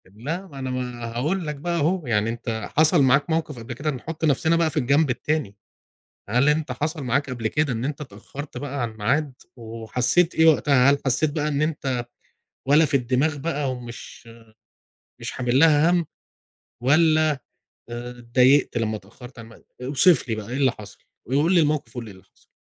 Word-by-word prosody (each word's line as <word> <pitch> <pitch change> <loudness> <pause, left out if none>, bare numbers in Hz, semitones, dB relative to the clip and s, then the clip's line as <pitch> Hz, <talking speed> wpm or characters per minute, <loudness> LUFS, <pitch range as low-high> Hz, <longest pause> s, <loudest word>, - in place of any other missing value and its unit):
لا 145 - -6
ما 140 -6 -11
أنا 130 -1 -4
ما 125 -2 -4
هاقول 160 +8 -1
لك 150 - -3
بقى 170 +4 -3
أهو، 165 0 0
يعني 110 -1 +1
أنت 115 -1 -4
حصل 160 +1 +5
معاك 140 +5 +3
موقف 160 -5 -2
قبل 115 +2 -7
كده 145 +6 -3
نحط 155 +5 -5
نفسنا 160 +3 +2
بقى 165 -1 +2
في 155 - -7
الجنب 140 +2 +2
التاني، 130 -3 -2 0.7
هل 125 +6 +2
أنت 150 -2 +1
حصل 150 +4 -3
معاك 130 +3 0
قبل 115 -3 -2
كده 150 +2 0
إن 115 +1 -3
أنت 145 +1 -4
اتأخرت 140 +3 -9
بقى 140 -1 -5
على 115 - -2
الميعاد، 130 +7 -1 0.2
وحسيت 120 +9 0
إيه 160 - +4
وقتها؟ 140 -4 +5
هل 140 - +2
حسيت 135 +3 +1
بقى 150 0 -2
إن 145 0 0
أنت 135 -6 -2 0.6
ولا 150 +4 +5
في 145 -1 +2
الدماغ 135 +4 0
بقى 145 -2 -2
ومش 120 -1 -9 0.9
مش - - -5
حامل 125 +1 0
لها 155 0 +5
همّ؟ 175 -2 +1 0.8
والّا 155 +3 +4 0.6
آآ، 120 +1 -6
اتضايقت 125 +3 +3
لما 110 -1 -1
اتأخرت 120 +5 -14
عن 115 - -9
الميعاد؟ 115 +1 -17 0.2
اوصف 145 +5 +4
لي 115 - 0
بقى 110 -1 -7
إيه 125 - -4
اللي 135 -3 +2
حصل، 105 -4 -12 0.3
وقل 145 +8 +2
لي 175 - +6
الموقف، 150 -3 -1
وقُل 120 - -4
لي 110 - -10
إيه 95 - -13
اللي 95 - -19
حصل؟ - - -31
140 Hz, 190 wpm, -23 LUFS, 120-155 Hz, 0.9 s, لي